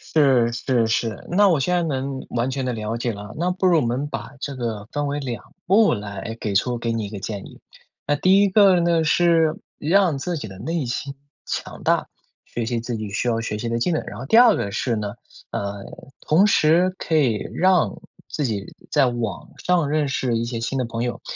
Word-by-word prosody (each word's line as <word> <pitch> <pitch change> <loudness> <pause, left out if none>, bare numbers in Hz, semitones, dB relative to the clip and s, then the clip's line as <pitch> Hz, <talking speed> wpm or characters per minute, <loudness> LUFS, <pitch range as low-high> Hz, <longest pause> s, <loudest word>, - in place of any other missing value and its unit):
是 130 -6 +4
是 120 -1 +1
是， 110 0 -1
那 200 +2 +5
我 160 -5 +3
现 180 +6 0
在 175 - +2
能 135 -3 -3
完 120 +2 -1
全 135 0 -2
地 - - 0
了 110 0 -3
解 120 0 -1
了。 105 +1 -8
那 175 +3 0
不 185 +1 -1
如 175 -3 +5
我 - - 0
们 125 +5 -1
把 135 - -6
这 140 -1 -5
个 115 -4 -4
分 145 -1 -1
为 145 +1 -2
2 125 -4 -5 0.2
步 205 +4 +4
来 105 +2 -6
给 105 -2 -2
出 120 +5 +1
给 115 0 -2
你 115 -2 -2
一 - - -6
个 105 -2 -6
建 100 0 -5
议。 - - -15 0.5
那 145 - +1
第 190 +6 +4
一 - - +4
个 190 -2 +5
呢 170 -1 +2
是 165 0 +3 0.2
让 170 -2 +3
自 175 +2 -2
己 110 - -6
的 95 0 -11
内 160 +3 -2
心 140 +3 -4 0.3
强 - - -5
大， - - +1 0.4
学 120 - -4
习 120 -2 -1
自 115 0 -4
己 110 -2 -5
需 105 +5 -2
要 115 -1 +1
学 105 -2 -3
习 115 +2 -3
的 115 0 -1
技 180 - +1
能。 160 - 0
然 - - -8
后 130 - -6
第 225 - +5
二 240 -3 +7
个 100 - -3
是 115 +2 -1
呢， 105 -1 -4 0.3
呃， 100 0 -4 0.4
同 175 +7 +4
时 175 -1 +4
可 160 - -1
以 120 -8 +1
让 185 0 +2 0.3
自 150 - -2
己 105 -4 -3 0.2
在 140 -3 +4
网 115 -6 -3 0.2
上 175 -5 +2
认 150 -1 +1
识 125 -3 0
一 115 - -1
些 120 -1 -4
新 125 +4 -2
的 125 - 0
朋 115 0 -4
友。 120 0 -3
130 Hz, 240 characters per minute, -22 LUFS, 115-165 Hz, 0.5 s, 二